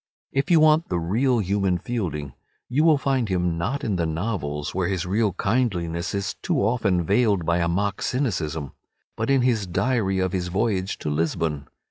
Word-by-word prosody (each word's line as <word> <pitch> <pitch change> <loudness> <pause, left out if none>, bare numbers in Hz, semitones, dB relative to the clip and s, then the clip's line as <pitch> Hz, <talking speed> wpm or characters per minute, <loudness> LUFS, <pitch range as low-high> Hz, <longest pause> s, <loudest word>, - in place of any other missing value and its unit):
If 135 +1 0
you 170 -2 +6
want 155 +1 +4
the 90 - 0
real 120 +10 +1
human 100 -3 +1
Fielding 85 - -4 0.3
you 140 +5 +1
will 160 -2 +5
find 135 -5 0
him 90 -2 0
not 135 - -2
in 105 -5 0
the 85 -2 0
novels, 80 -4 -3
where 90 -1 0
his 95 -2 -1
real 105 +3 +1
kindliness 95 -4 -1
is 100 0 -2
too - - 0
often 100 -5 +1
veiled 100 -2 +2
by 85 +1 +2
a 85 - +1
mock 100 +4 -1
cynicism, 80 - -2 0.4
but 110 +3 -2
in 135 -2 +3
his 115 -6 +1
"Diary 100 0 0
of 95 -1 0
his 90 -2 -2
Voyage 95 0 -1
to 75 - -3
Lisbon." 80 -2 -1
95 Hz, 180 wpm, -24 LUFS, 85-120 Hz, 0.4 s, you